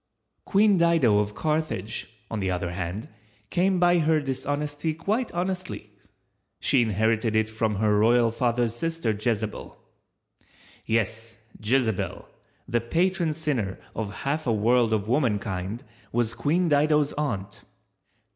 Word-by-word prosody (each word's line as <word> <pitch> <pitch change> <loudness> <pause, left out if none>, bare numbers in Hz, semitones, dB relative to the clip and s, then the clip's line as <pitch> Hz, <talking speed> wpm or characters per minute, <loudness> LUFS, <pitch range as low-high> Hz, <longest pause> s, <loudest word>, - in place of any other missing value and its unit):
Queen 205 0 +4
Dido 165 -11 +4
of 105 0 -2
Carthage, 150 - -2 0.2
on 110 - -2
the 95 -1 -1
other 90 -1 -2
hand, 90 +3 -4 0.4
came 185 +1 +2
by 175 0 +4
her 160 0 +3
dishonesty 145 +3 -2
quite 215 +9 -1
honestly—she 105 - -3
inherited 110 +1 +1
it 110 0 +3
from 110 -1 -1
her 105 0 +2
royal 115 +1 +4
father's 120 -1 0
sister 165 -3 -1
Jezebel. 110 0 -3 1.1
Yes, 115 +1 -1 0.3
Jezebel, 115 -2 0 0.4
the 120 0 0
patron 170 +6 +1
sinner 140 -11 -2 0.2
of 100 -4 -4
half 145 +1 -1
a - - +3
world 115 +2 +3
of 105 -2 0
womankind, 105 -5 -1 0.3
was 120 -1 0
Queen 155 +9 +1
Dido's 150 -1 +3
aunt. 115 -11 -3
120 Hz, 120 wpm, -26 LUFS, 105-155 Hz, 1.1 s, Queen